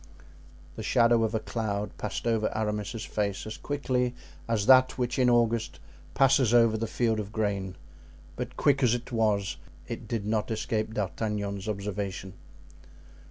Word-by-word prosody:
The - - -4
shadow 115 -1 +3
of 110 0 0
a - - +1
cloud 105 -2 -3
passed 105 - -4
over 115 -2 +1
Aramis's 105 +1 -2
face 100 -2 -2
as 110 - -5
quickly 125 -4 -1 0.3
as 110 -3 0
that 130 0 +6
which 125 +1 -1
in 125 -1 +4
August 115 -1 +1 0.4
passes 130 -3 +4
over 115 -2 +5
the 115 +1 -2
field 110 -1 0
of 105 -1 -5
grain; 100 -4 -2 0.6
but - - -6
quick 140 -1 +3
as 120 -2 +4
it 120 +1 -7
was, 105 -6 +1 0.3
it 115 -1 -6
did 110 -3 -2
not 110 +1 0
escape 110 0 -2
D'Artagnan's 100 0 -2
observation. 100 -2 -4
110 Hz, 150 wpm, -28 LUFS, 105-120 Hz, 0.6 s, that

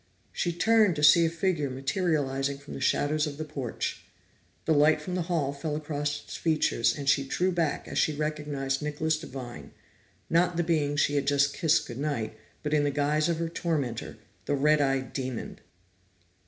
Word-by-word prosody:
She 175 - -1
turned 215 +1 +3
to 150 - -3
see 165 +3 +7
a - - 0
figure 165 -4 -1
materializing 135 -1 -1
from 140 +1 -11
the - - -6
shadows 150 +3 +1
of 145 -1 -6
the 155 - -4
porch. 140 -6 -4 0.6
The 160 - +3
light 150 +1 +4
from 165 +4 -6
the 180 - 0
hall 145 -5 0
fell 150 +1 -3
across 145 -1 -3
its - - -9
features, 155 -8 +1
and 140 -1 -6
she 140 0 +4
drew 180 +7 0
back 165 -4 -1
as - - -2
she - - +3
recognized 150 -2 -2
Nicholas 150 +1 -1
Devine 130 -6 -8 0.5
not 170 +1 +2
the 175 - +2
being 150 -3 +1
she 145 0 +2
had 140 -1 -1
just 140 0 +3
kissed 160 -2 +2
good 120 0 -7
night, 140 -8 -2 0.3
but 150 0 -2
in 150 -1 +3
the 145 - +2
guise 150 +3 +1
of 170 - 0
her 165 0 -1
tormentor, 145 -10 -3 0.3
the 145 - +1
red 150 +2 +3
eyed 135 -2 0
demon! 130 -3 -4
150 Hz, 185 wpm, -28 LUFS, 140-160 Hz, 0.6 s, see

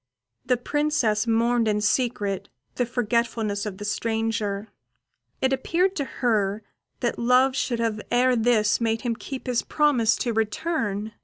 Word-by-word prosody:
The 250 -1 +3
Princess 245 -5 0
mourned 230 0 +2
in 210 -1 +1
secret 210 -3 0 0.2
the 245 - -1
forgetfulness 230 -3 -1
of 195 -2 -6
the 205 - -6
stranger: 220 -1 -2 0.7
it 265 0 +3
appeared 355 +8 +1
to 285 - -1
her 215 -5 0 0.4
that 240 -2 -1
love 250 +2 +4
should 245 -3 -1
have 225 -2 -1
ere 250 +1 +3
this 225 -2 +2
made 225 -1 0
him 240 -3 -1
keep 265 +3 -7
his 250 -2 +1
promise 265 -7 +2
to 240 -3 -2
return. 220 -2 -1
230 Hz, 145 wpm, -25 LUFS, 215-250 Hz, 0.7 s, love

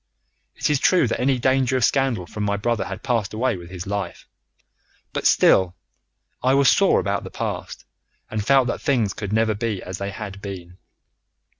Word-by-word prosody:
It - - -1
is 145 - +2
true 180 -4 +4
that 115 - -2
any 130 +1 +2
danger 130 +1 +2
of 125 - +3
scandal 130 -9 +1
from 105 - -7
my 100 0 0
brother 115 +1 -1
had - - -7
passed 115 -5 -1
away 125 +1 +1
with 85 -2 -10
his 90 -1 -7
life; 100 0 -4 0.9
but - - +1
still, 90 -2 +4 0.7
I 130 +1 +3
was 140 -1 +5
sore 195 - +4
about 100 -1 -1
the - - -7
past, - - -5 0.5
and 110 -1 -2
felt 135 +3 +4
that 120 - -3
things 120 -9 +1
could 105 -2 -6
never 110 0 +2
be 105 -2 -2
as 95 +1 -6
they 100 0 -3
had 100 -1 -7
been. 90 -3 -8
110 Hz, 185 wpm, -22 LUFS, 100-130 Hz, 0.9 s, was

